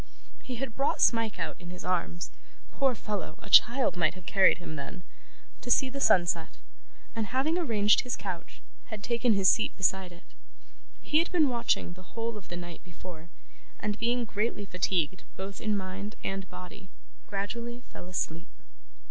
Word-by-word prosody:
He 255 Hz, -, -5 dB
had 245 Hz, -1 st, -4 dB
brought 275 Hz, -, +1 dB
Smike 230 Hz, -2 st, +3 dB
out -, -, -3 dB
in 175 Hz, -1 st, -9 dB
his 180 Hz, 0 st, -8 dB
arms 175 Hz, -1 st, -1 dB, 0.4 s
poor 270 Hz, -3 st, +2 dB
fellow! 205 Hz, -7 st, -4 dB
a 200 Hz, -, -12 dB
child 245 Hz, 0 st, +6 dB
might 165 Hz, -1 st, +2 dB
have 185 Hz, -1 st, -12 dB
carried 195 Hz, +1 st, +5 dB
him 175 Hz, -3 st, -7 dB
then 140 Hz, +5 st, -7 dB, 0.6 s
to -, -, -6 dB
see 260 Hz, +1 st, +4 dB
the 275 Hz, -, -4 dB
sunset, 175 Hz, -7 st, +3 dB, 0.6 s
and, 225 Hz, -2 st, -1 dB
having 265 Hz, +8 st, +1 dB
arranged 215 Hz, -, +4 dB
his 250 Hz, -, -2 dB
couch, 185 Hz, -4 st, -6 dB, 0.2 s
had 215 Hz, -2 st, -7 dB
taken 235 Hz, 0 st, +2 dB
his 195 Hz, -2 st, +4 dB
seat 220 Hz, -, +3 dB
beside 190 Hz, 0 st, +1 dB
it. 175 Hz, 0 st, -14 dB, 0.8 s
He 305 Hz, -, +3 dB
had 335 Hz, -, 0 dB
been 320 Hz, -6 st, +4 dB
watching 235 Hz, -7 st, +1 dB
the 185 Hz, +4 st, -16 dB
whole 230 Hz, 0 st, -1 dB
of 210 Hz, -, -10 dB
the 175 Hz, -, -5 dB
night 175 Hz, -1 st, -8 dB
before, 175 Hz, -2 st, -11 dB, 0.5 s
and 210 Hz, 0 st, -2 dB
being 240 Hz, +1 st, +1 dB
greatly 210 Hz, -1 st, -1 dB
fatigued 180 Hz, -2 st, 0 dB, 0.2 s
both 195 Hz, +1 st, -6 dB
in 215 Hz, -2 st, +1 dB
mind 195 Hz, +3 st, -5 dB
and 195 Hz, -1 st, -3 dB
body, 180 Hz, +1 st, -10 dB, 0.4 s
gradually 235 Hz, +5 st, -4 dB
fell 175 Hz, -, -9 dB
asleep. 170 Hz, -1 st, -3 dB
200 Hz, 170 wpm, -29 LUFS, 180-235 Hz, 0.8 s, child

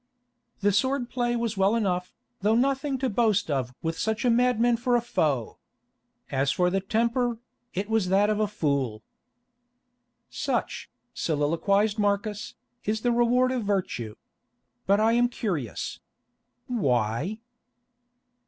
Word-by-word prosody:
"The 205 Hz, +1 st, +3 dB
sword 250 Hz, +5 st, 0 dB
play 240 Hz, -1 st, 0 dB
was 230 Hz, -3 st, -2 dB
well 195 Hz, +3 st, +3 dB
enough, 180 Hz, -5 st, -1 dB, 0.2 s
though 210 Hz, +3 st, +2 dB
nothing 270 Hz, +2 st, +1 dB
to 265 Hz, +1 st, -1 dB
boast 210 Hz, -6 st, +1 dB
of 125 Hz, -3 st, -2 dB
with 165 Hz, 0 st, -2 dB
such 220 Hz, +1 st, -1 dB
a 245 Hz, -, +4 dB
madman 240 Hz, 0 st, +3 dB
for 245 Hz, +1 st, +1 dB
a -, -, +4 dB
foe. 150 Hz, -, -1 dB, 0.7 s
As 135 Hz, +1 st, +1 dB
for 180 Hz, 0 st, +1 dB
the 195 Hz, -, +1 dB
temper, 235 Hz, +4 st, 0 dB, 0.4 s
it 195 Hz, +2 st, -2 dB
was 220 Hz, -4 st, +1 dB
that 195 Hz, +2 st, +4 dB
of 215 Hz, 0 st, 0 dB
a 215 Hz, -, +2 dB
fool." 140 Hz, -, -1 dB, 1.3 s
"Such," -, -, -2 dB, 0.2 s
soliloquised 195 Hz, +8 st, +1 dB
Marcus, 205 Hz, 0 st, -1 dB, 0.3 s
"is 215 Hz, +1 st, -1 dB
the 245 Hz, -, +2 dB
reward 245 Hz, +2 st, +3 dB
of 250 Hz, -3 st, -1 dB
virtue. 185 Hz, -, -2 dB, 0.7 s
But 200 Hz, +1 st, +4 dB
I 220 Hz, +1 st, +4 dB
am 240 Hz, +1 st, +3 dB
curious. 175 Hz, -, -3 dB, 0.7 s
Why?" 140 Hz, -, 0 dB
210 Hz, 135 wpm, -26 LUFS, 180-240 Hz, 1.3 s, a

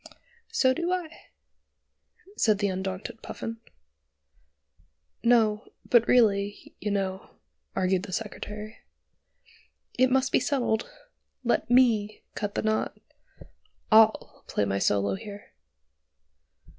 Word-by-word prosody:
"So 260 Hz, -, +3 dB
do 345 Hz, +4 st, -2 dB
I," 350 Hz, -3 st, -4 dB, 1.1 s
said 215 Hz, -, +3 dB
the 200 Hz, 0 st, 0 dB
undaunted 190 Hz, +4 st, -5 dB
Puffin. 230 Hz, 0 st, -6 dB, 1.7 s
"No, 225 Hz, -2 st, +3 dB, 0.2 s
but 235 Hz, -1 st, +4 dB
really, 205 Hz, -4 st, +2 dB
you 210 Hz, -, -3 dB
know," 195 Hz, -2 st, -2 dB, 0.5 s
argued 185 Hz, 0 st, +1 dB
the 200 Hz, -1 st, -8 dB
Secretary, 210 Hz, +1 st, -6 dB, 1.2 s
"it 255 Hz, 0 st, +5 dB
must 265 Hz, 0 st, +2 dB
be -, -, +4 dB
settled: 240 Hz, -6 st, 0 dB, 0.5 s
let 240 Hz, 0 st, 0 dB
me 225 Hz, -4 st, +3 dB
cut 205 Hz, -1 st, -4 dB
the -, -, -1 dB
knot. 215 Hz, 0 st, -1 dB, 0.9 s
I'll 220 Hz, 0 st, +4 dB
play 105 Hz, -, 0 dB
my 100 Hz, 0 st, -1 dB
solo 100 Hz, -1 st, +1 dB
here." 205 Hz, -, -9 dB
215 Hz, 105 wpm, -27 LUFS, 200-245 Hz, 1.7 s, it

